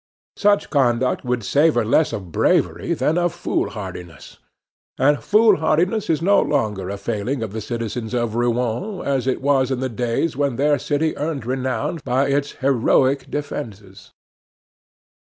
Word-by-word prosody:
Such 205 0 +2
conduct 125 -3 +1
would 125 -2 -2
savor 140 +1 +2
less 150 +8 +2
of 95 -4 -6
bravery - - +1
than 160 +3 +1
of 175 -1 0
fool 175 - -1
hardiness. 90 -5 -9 0.6
And 145 +2 +2
foolhardiness 205 -2 +3
is 160 -1 +1
no 200 +3 +4
longer 105 -9 -1
a 100 - -4
failing 115 +5 -3
of 105 -3 -6
the 110 - -4
citizens 115 +1 -4
of 120 -2 -1
Rouen 120 - -1
as 135 -2 0
it 130 - -1
was 135 -2 +2
in 130 -2 -1
the 130 0 -2
days 120 +6 -1
when 140 -2 0
their 145 +2 +2
city 150 +4 -1
earned 145 -5 -3
renown 130 +5 -2
by 135 +3 +1
its 140 +1 0
heroic 135 +1 +1
defenses. 110 -9 -7
130 Hz, 150 wpm, -21 LUFS, 115-150 Hz, 0.6 s, no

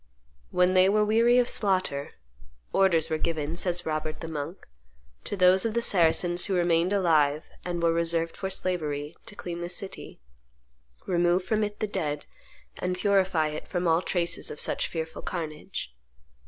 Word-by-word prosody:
When 180 0 +3
they 185 0 +5
were 210 +1 +3
weary 230 +3 +4
of 245 -1 +4
slaughter, 185 -11 0 0.6
"orders 170 -5 +3
were 155 - 0
given," 160 -1 -2
says 175 0 -2
Robert 155 0 -3
the 165 - -6
monk, 160 +2 -6 0.6
"to 205 - -4
those 185 0 +5
of 225 -1 -1
the 235 - +2
Saracens 175 -2 +2
who 195 - -1
remained 175 0 +2
alive 155 -6 +3 0.2
and 175 -1 -3
were 165 0 +4
reserved 165 0 +1
for 190 - -4
slavery, 155 -6 -2
to 205 - -9
clean 175 -3 -6
the 175 - -4
city, 190 +2 -8 0.9
remove 175 0 +2
from 215 +2 0
it 210 0 -4
the - - +2
dead, 150 -8 -3 0.5
and 180 0 -1
purify 190 -5 +2
it 150 0 -6
from 175 -1 -1
all 165 +1 +3
traces 175 -2 0
of - - -7
such - - 0
fearful 160 -1 -5
carnage. 155 - -5
175 Hz, 165 wpm, -27 LUFS, 160-190 Hz, 0.9 s, they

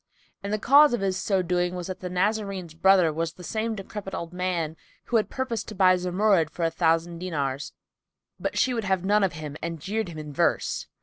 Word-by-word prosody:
And 200 - -4
the 215 - +1
cause 280 +4 +6
of 240 - -5
his 190 -1 0
so 190 -1 0
doing 180 0 0
was 180 -1 -4
that 185 +1 -6
the 180 - -5
Nazarene's 195 -2 -1
brother 180 -1 +4
was 165 +1 -2
the 180 - -13
same 220 +4 -2
decrepit 195 -1 -6
old 170 +1 -6
man 180 -3 -2 0.3
who 230 -2 +2
purposed 260 -2 -4
to 215 - -7
buy 185 -1 +5
Zumurrud 180 -1 +2
for 170 +1 -2
a 165 - +1
thousand 165 0 +1
dinars, 145 -6 -3 0.7
but - - -3
she 255 -3 +2
would 225 -5 -2 0.2
none 205 +1 +3
of 190 - +1
him 150 -1 -7
and 165 -1 -4
jeered 210 +5 -2
him 165 - -9
in 150 -1 -7
verse. - - 0
185 Hz, 205 wpm, -26 LUFS, 165-205 Hz, 0.7 s, cause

